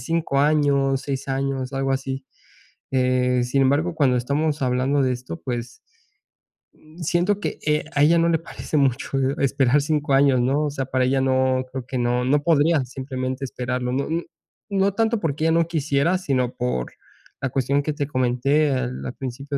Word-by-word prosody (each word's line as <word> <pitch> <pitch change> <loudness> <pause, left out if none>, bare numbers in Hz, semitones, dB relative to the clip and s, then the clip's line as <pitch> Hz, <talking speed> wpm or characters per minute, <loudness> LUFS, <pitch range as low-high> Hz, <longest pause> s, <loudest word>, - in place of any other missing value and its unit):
5 155 0 -1
años, 140 -2 +2
6 135 -1 -4
años, 135 -1 -2
algo 135 0 0
así. 135 0 -3 0.7
Eh, 125 -1 +2
sin 135 +3 +1
embargo, 145 +6 +1
cuando 135 -5 +2
estamos 145 +4 -1
hablando 130 +2 +1
de 130 -1 +1
esto, 125 +6 -7
pues, 120 -2 -5 1.0
mm, 155 +1 -19
siento 175 +5 +1
que, - - -4
eh, 150 -1 +1
a 145 - +4
ella 165 +3 +5
no 165 - +3
le 165 - +3
parece 165 -1 -7
mucho, 135 -1 +1
eh, 135 +1 0
esperar 140 0 +2
5 150 -1 -1
años, 135 -2 +4
¿no?, 140 +5 +1
o - - 0
sea, 135 -1 -3
para 130 0 0
ella 135 +1 +1
no 130 -1 +2
creo 130 -2 -5
que 130 - -3
no 125 0 0
no 145 +3 +2
podría 155 -1 +3
simplemente 130 +1 -4
esperarlo. 125 -1 -3
No 140 +2 -1
n 165 +2 -2 0.4
no 200 -1 +1
tanto 225 +1 +1
porque 155 -4 -2
ella 165 - +3
no 165 0 +2
quisiera, 160 +1 +1
sino 130 -9 -1
por 125 - -2 0.5
la 130 - -1
cuestión 140 +2 0
que 155 - -2
te 145 -1 -3
comenté 135 +3 +1
al 130 -1 -3
al 125 - -4
principio 140 +2 -5
135 Hz, 185 wpm, -23 LUFS, 130-150 Hz, 1.0 s, ella